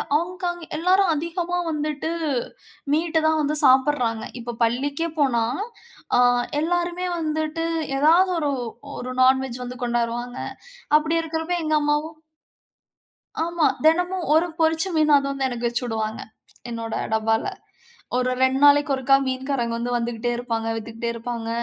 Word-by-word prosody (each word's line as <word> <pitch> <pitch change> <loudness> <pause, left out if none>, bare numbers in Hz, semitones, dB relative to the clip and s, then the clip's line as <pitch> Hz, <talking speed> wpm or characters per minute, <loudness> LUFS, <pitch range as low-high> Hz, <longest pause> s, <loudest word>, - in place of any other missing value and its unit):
Hong Kong 350 +1 -2
எல்லாரும் 365 +2 +3
அதிகமா 340 +3 -2
வந்துட்டு 300 +1 -2 0.8
மீட்டு 320 0 +1
தான் 315 0 +2
வந்து 300 +1 +1
சாப்பட்றாங்க. 255 -4 +3 0.2
இப்போ 240 0 -5
பள்ளிக்கே 280 +8 0
போனா, 240 -5 +2 0.7
ஆ. - - +4 0.4
எல்லாருமே 350 +2 -1
வந்துட்டு 315 +1 -2 0.3
ஏதாவது 345 +5 +5
ஒரு 295 -2 0 0.5
ஒரு 255 +1 -5
நான்வெஜ் 260 -1 +3
வந்து 250 +1 -7
கொண்டாருவாங்க. 240 +1 -2 0.6
அப்படி 315 +2 -1
இருக்கிறப்போ 325 +2 -2
எங்க 310 0 +2
அம்மாவும் 300 +2 -1 1.3
ஆமா. 340 -1 0 0.2
தெனமும் 355 +2 +2
1 325 +3 +4
பொறிச்ச 320 +2 +2
மீன் 305 -1 +4
அது 275 - -1
வந்து 275 -1 -2
எனக்கு 240 -1 -2
வச்சுவுடுவாங்க, 225 -2 -2 0.5
என்னோட 230 -1 -4 0.2
டப்பால. 220 +1 +1 0.7
ஒரு 255 0 +1
2 260 0 +3
நாளைக்கு 290 0 +5
ஒருக்கா 265 +1 +4
மீன்காரங்க 260 -2 -2
வந்து 245 +1 -2
வந்துக்கிட்டே 240 0 -2
இருப்பாங்க, 230 -2 -3
வித்துக்கிட்டே 230 +1 -4
இருப்பாங்க. 230 0 -5
285 Hz, 125 wpm, -23 LUFS, 240-320 Hz, 1.3 s, ஏதாவது